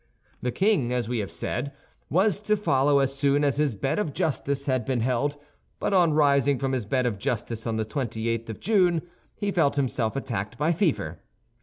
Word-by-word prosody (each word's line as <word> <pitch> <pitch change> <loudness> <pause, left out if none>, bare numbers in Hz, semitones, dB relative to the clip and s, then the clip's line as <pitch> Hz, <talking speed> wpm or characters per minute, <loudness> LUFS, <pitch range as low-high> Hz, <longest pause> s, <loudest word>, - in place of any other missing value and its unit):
The 125 - -1
king, 190 - +2
as 125 -3 0
we 120 -1 -1
have 100 - -3
said, 140 - -4 0.4
was 195 +6 +2
to 210 0 +1
follow 140 -7 +3
as 135 -1 +2
soon 140 +1 +2
as 140 -1 +1
his 145 -6 +1
Bed 135 - -1
of 155 -9 -2
Justice 140 -2 -1
had 130 -3 +1
been 125 0 -1
held; 130 +4 0 0.4
but - - -1
on 175 -4 +4
rising 140 -2 +3
from 135 +1 -1
his 125 -5 -1
Bed 125 +4 0
of 110 -5 -1
Justice 115 +1 -3
on 115 - -1
the 110 0 -1
twenty 115 -1 -3
eighth 115 0 -2
of 110 - -6
June, 180 -6 +2 0.3
he 205 -1 -2
felt 160 -7 +2
himself 125 -5 0
attacked 115 -4 -3
by 150 +3 +2
fever. 150 - 0
135 Hz, 200 wpm, -26 LUFS, 120-150 Hz, 0.4 s, on